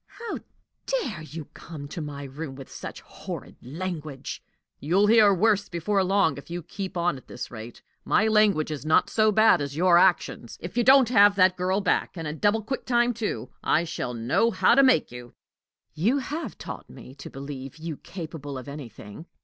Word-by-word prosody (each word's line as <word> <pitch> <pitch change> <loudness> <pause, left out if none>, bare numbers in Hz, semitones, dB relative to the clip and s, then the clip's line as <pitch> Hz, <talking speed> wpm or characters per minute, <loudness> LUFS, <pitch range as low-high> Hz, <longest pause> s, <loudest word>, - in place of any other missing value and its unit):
"How 460 0 -5 0.5
dare 465 - -2
you 155 0 -8
come 155 -4 -9
to 165 - -6
my 145 -1 -6
room 140 +1 -7
with 135 -1 -11
such - - -8
horrid - - -8
language!" 155 -1 -6 0.4
"You'll 180 +8 +2
hear 215 -1 +6
worse 200 +1 +2
before 190 +3 0
long, 185 -7 +2
if 140 - -15
you 175 0 -5
keep 190 +2 -6
on 170 -4 +1
at 130 - -15
this - - -7
rate. 115 0 -10 0.2
My 220 - +2
language 210 -8 +3
is 150 -2 -5
not 155 +1 +3
so 215 -1 +3
bad 220 -5 +5
as 140 0 -4
your 175 0 +5
actions. 175 -10 +1
If 175 - -8
you 240 - +2
don't 265 -1 +6
have 205 -4 +6
that 185 -1 +4
girl 185 +2 0
back, 195 - 0
and 165 -2 -4
in 150 +1 -5
double 210 +1 +2
quick 265 +6 -5
time, 240 0 +3
too, 220 -2 -4
I 165 - +2
shall 140 -7 -4
know 120 - +2
how 235 - +3
to 275 - +6
make 260 - +3
you!" 125 0 -10 0.6
"You 220 - +1
have 295 +4 -5
taught - - -8
me 130 - -12
to 135 - -10
believe 135 -1 -8
you 160 -2 -6
capable 155 -6 -7
of 130 - -9
anything." 140 - -9
175 Hz, 190 wpm, -26 LUFS, 145-210 Hz, 0.6 s, hear